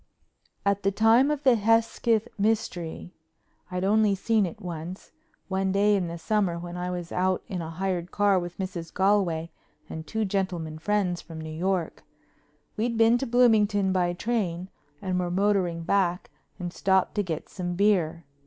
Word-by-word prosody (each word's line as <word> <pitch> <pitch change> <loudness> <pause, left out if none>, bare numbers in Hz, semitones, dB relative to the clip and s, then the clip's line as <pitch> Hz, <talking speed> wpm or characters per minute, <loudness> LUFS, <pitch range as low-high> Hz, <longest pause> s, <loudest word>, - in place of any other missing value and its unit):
At 200 0 +2
the 195 - +2
time 225 +7 +4
of 300 -1 -2
the 260 -2 +6
Hesketh 225 0 +2
mystery 200 -5 -2 0.6
I'd 180 0 -3
only 210 0 +3
seen 215 0 +1
it 170 - -9
once, 175 +1 -7 0.4
one 190 0 0
day 205 +2 +3
in 185 -3 0
the 170 0 -5
summer 195 -1 0
when 175 +1 -7
I 180 0 -3
was 175 -2 -5
out 185 0 0
in 185 -6 -4
a 160 - -5
hired 180 0 -2
car 205 -1 +3
with 175 0 -7
Mrs. 175 -4 -5
Galway 190 -4 +1 0.4
and 160 0 -7
two 220 -1 -1
gentlemen 180 -5 -2
friends 185 -1 0
from 165 -2 -10
New 160 0 -6
York. 180 0 -2 0.7
We'd 230 +1 -1
been 230 +2 +5
to 270 - -3
Bloomington 215 -5 +3
by 175 -2 +1
train 185 -3 -2 0.3
and 185 -1 0
were 180 -1 -1
motoring 185 -3 +1
back 180 0 0 0.3
and 175 -2 -5
stopped 190 -1 +2
to 210 - +1
get 165 -5 -4
some 175 -2 -4
beer. 175 -5 +1
190 Hz, 165 wpm, -26 LUFS, 175-210 Hz, 0.7 s, the